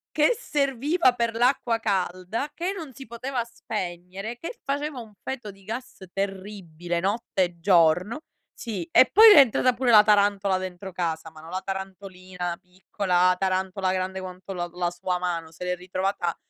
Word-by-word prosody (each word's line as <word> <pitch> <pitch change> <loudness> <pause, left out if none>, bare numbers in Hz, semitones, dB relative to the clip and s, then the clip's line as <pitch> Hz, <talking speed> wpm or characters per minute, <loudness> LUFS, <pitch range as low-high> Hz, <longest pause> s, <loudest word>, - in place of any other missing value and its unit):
che 305 +10 +4
serviva 285 - +1
per 235 -2 -1
l'acqua 240 -1 +2
calda 190 +5 -2
che 355 +4 -2
non 320 -8 -8
si 270 +2 -10
poteva 240 +2 -3
spegnere, 195 -1 -6
che 335 - -7
faceva 285 0 -3
un 220 -3 -11
feto 240 -6 -5
di 195 0 -20
gas 230 +6 -7
terribile, 190 -4 -4
notte 195 +1 0
e 175 -1 -4
giorno, 180 - +3 0.3
sì, 200 -8 -6
e - - +7
poi 440 +3 +10
le 420 - +9
è - - +10
entrata 255 -1 +4
pure 245 0 +1
la 210 -2 +9
tarantola 200 -2 +3
dentro 185 +1 -6
casa, 165 -3 -3
ma 155 -1 -14
non 165 +1 -11
la 185 +1 -3
tarantolina 185 -2 -6
piccola, 180 0 0
tarantola 190 0 0
grande 185 0 -2
quanto 185 0 -8
la 175 -1 -3
la 175 -1 -1
sua 180 +1 -3
mano, 170 -3 -3
se 165 - -9
l'è 180 0 -1
ritrovata 185 -1 -2
195 Hz, 165 wpm, -25 LUFS, 180-235 Hz, 0.3 s, poi